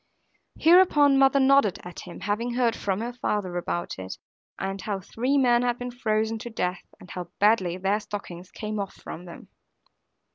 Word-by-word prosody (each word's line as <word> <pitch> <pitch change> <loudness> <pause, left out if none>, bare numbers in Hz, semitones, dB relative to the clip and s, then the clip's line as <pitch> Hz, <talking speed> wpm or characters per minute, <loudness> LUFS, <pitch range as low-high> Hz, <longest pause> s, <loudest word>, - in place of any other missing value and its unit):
Hereupon 315 -5 +5
mother 270 0 +5
nodded 270 -7 +4
at 180 0 -9
him, 175 - -10
having 230 +4 -2
heard 240 -2 +2
from 195 +1 -2
her 240 +2 -4
father 210 -7 -2
about 175 - -3
it, 95 0 -6 0.4
and 195 0 -4
how 205 -2 -3
three 250 +9 -1
men 240 -3 +4
had 245 -1 0
been 245 0 -5
frozen 220 -2 -1
to 240 +1 -7
death, 180 -5 -2 0.2
and 180 - -13
how 180 -1 -5
badly 195 -4 +3
their 195 +3 +1
stockings 185 -4 -8
came 215 -1 -5
off 200 -1 -4
from 175 - -9
them. 170 - -12
215 Hz, 175 wpm, -26 LUFS, 185-245 Hz, 0.4 s, Hereupon